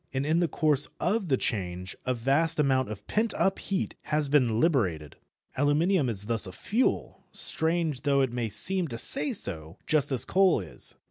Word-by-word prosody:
And 135 +1 -2
in 160 +3 +2
the 175 - +2
course 150 -3 +3
of 210 -2 0
the 135 -4 +2
change 90 -4 -3
a 130 - +1
vast 140 +7 +2
amount 130 -4 +2
of 105 -1 -8
pent 220 +1 -1
up 195 0 +1
heat 195 -1 -2
has 150 -1 0
been 125 -6 +2
liberated. 95 - 0 0.4
Aluminium 145 +2 +2
is 100 -3 0
thus 115 -2 -1
a - - -7
fuel, 220 - -1
strange 160 -4 -1
though 140 -2 +2
it 130 -3 0
may 120 -2 -2
seem 175 - 0
to 120 -5 -6
say 275 - +1
so, 80 - -4
just 145 -2 +1
as 130 - +3
coal 190 -5 +3
is. 90 -7 -4
140 Hz, 185 wpm, -27 LUFS, 115-165 Hz, 0.4 s, course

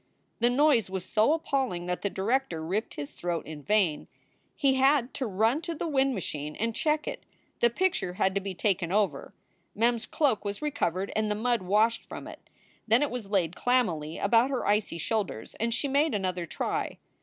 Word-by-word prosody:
The 240 +1 +4
noise 255 -5 +3
was 190 -1 -4
so 215 +8 +3
appalling 270 - -1
that 180 0 -2
the 200 - 0
director 195 -5 -1
ripped 200 +7 -2
his 145 -1 -6
throat 170 -1 -3
in 155 -1 -8
vain. 190 -4 +1 0.5
He 275 -2 +3
had 265 -1 +3
to 260 - -2
run 220 +9 +1
to 335 0 -4
the 330 - -3
wind 270 -3 +2
machine 150 -5 -4
and 230 +2 -1
check 305 +5 0
it. - - -4 0.4
The 235 - +5
picture 350 - 0
had 190 0 +1
to 200 - 0
be 195 -1 -5
taken 185 -3 0
over. 205 0 0 0.4
Mem 235 +3 +3
s 230 -1 -6
cloak 270 -10 +1
was 200 -1 -3
recovered, 195 - -1
and 215 0 +1
the 210 - 0
mud 235 +1 +1
washed 215 +5 +2
from - - -8
it. - - -12 0.4
Then 230 +5 +4
it 290 - -1
was 235 -5 -5
laid 185 -4 +1
clammily 175 -12 0
about 230 +5 +3
her 265 -3 -2
icy 205 -4 +1
shoulders 185 - -2
and 230 +1 0
she 260 +5 0
made 285 0 +2
another 185 -3 -2
try. - - -2
215 Hz, 195 wpm, -28 LUFS, 185-260 Hz, 0.5 s, The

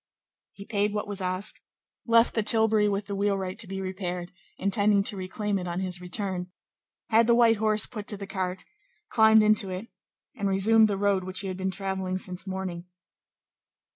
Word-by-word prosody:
He 200 - -11
paid 205 -1 -1
what 210 - -3
was 205 -1 -4
asked, 185 +2 -1 0.5
left 230 0 +4
the 225 - +1
tilbury 220 -1 +3
with 200 0 -2
the 200 - -6
wheelwright 195 0 -2
to 225 - -2
be 195 +1 -5
repaired, 180 -2 -5 0.3
intending 200 +1 +2
to 205 - 0
reclaim 200 +2 -3
it 180 - -5
on 175 +1 -3
his 180 -1 -3
return, 180 -1 -3 0.6
had 225 +1 +4
the 235 - +5
white 230 -2 +4
horse 215 0 +2
put 210 -4 -8
to 205 - -3
the 200 - -7
cart, 185 -2 -4 0.4
climbed 220 -1 +5
into 215 -2 +3
it, 185 +5 -6 0.5
and 200 -1 -2
resumed 215 +3 +5
the 200 -2 -2
road 200 -1 +1
which 185 +1 +1
he 195 - -4
had 185 - -5
been 190 0 -2
travelling 190 -1 -3
since 185 +1 -3
morning. 185 -2 -5
200 Hz, 185 wpm, -26 LUFS, 185-210 Hz, 0.6 s, the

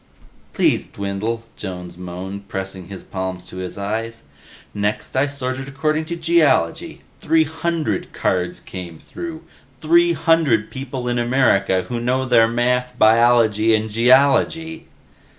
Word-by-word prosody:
"Please, - - +2
Dwindle," 100 +3 -4
Jones 90 -3 -7
moaned, 90 +3 -7
pressing 95 -3 -6
his 100 -2 -9
palms 95 -1 -5
to - - -11
his 95 0 -6
eyes. 110 +3 -4 0.5
"Next 105 +4 -2
I 135 +2 +3
sorted 135 -1 -4
according 155 +3 -1
to 170 - -4
Geology. 165 - +1 0.2
Three 160 0 +3
hundred 160 - -2
cards 90 -1 -1
came 90 -3 -8
through. 160 - -8 0.4
Three 170 +3 +4
hundred 155 -9 +2
people 130 -2 -5
in 120 0 0
America 120 -7 +2
who 120 - -3
know 130 +2 0
their 120 -3 +5
math, 125 +2 0
biology 115 -1 +4
and 110 0 -2
geology!" 140 +7 +3
120 Hz, 130 wpm, -20 LUFS, 100-140 Hz, 0.5 s, their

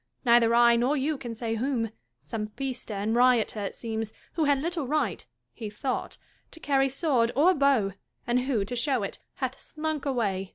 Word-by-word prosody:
Neither 235 -1 +5
I 235 0 +6
nor 255 +5 +2
you 295 +3 0
can 240 -4 -6
say 225 0 -3
whom 230 -1 -1 0.2
— 120 +2 -50
some 210 +8 -4
feaster 250 -1 -5
and 210 +3 -1
rioter, 245 -3 +3
it 200 -1 -4
seems, 220 -1 -4 0.2
who 325 -3 +1
had 285 -1 +4
little 325 -2 -2
right 275 - 0 0.3
(he 220 - -6
thought) 250 +5 -3 0.3
to 325 - -13
carry 270 -3 +2
sword 260 -4 +1
or 330 +8 +5
bow, 275 - +3 0.3
and 240 +1 +2
who, 250 -6 0
to 245 - -4
show 250 -2 +1
it, 195 - -5 0.2
hath 260 -1 -3
slunk 310 -2 -4
away. 200 -8 -1
245 Hz, 190 wpm, -27 LUFS, 220-275 Hz, 0.3 s, I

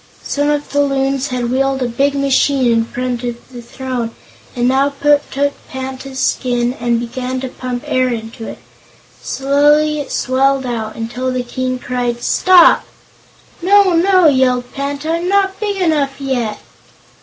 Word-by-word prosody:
Some 290 +1 -1
of 295 0 -1
the 285 +1 +2
Loons 275 -1 0
had 245 -3 -2
wheeled 270 0 +1
a - - 0
big 275 +4 0
machine 275 -2 +2
in 225 0 +1
front 250 0 -4
of 240 -1 -3 0.2
the 240 - -8
throne 250 -1 -4 0.5
and 245 0 +1
now 270 +2 +3
took 285 -1 +1
Panta's 265 0 -6
skin 245 -2 0
and 235 -1 +1
began 250 +2 -4
to 265 - -3
pump 250 -1 -5
air 255 0 +1
into 225 -1 -6
it. - - -7 0.6
Slowly 295 +2 +2
it 285 - -6
swelled 270 +1 +1
out 225 -3 -4
until 240 +3 -3
the 255 -1 -2
King 255 +1 -3
cried 245 -1 -3
"Stop!" 365 -2 +5 0.8
"No, 390 +1 +4
no!" 365 +1 +4
yelled 255 -3 +2
Panta, 285 +3 -3
"I'm 340 +2 -1
not 390 -1 +1
big 410 -2 -2
enough 295 -6 0
yet." 250 -6 -2
265 Hz, 155 wpm, -16 LUFS, 245-285 Hz, 0.8 s, Stop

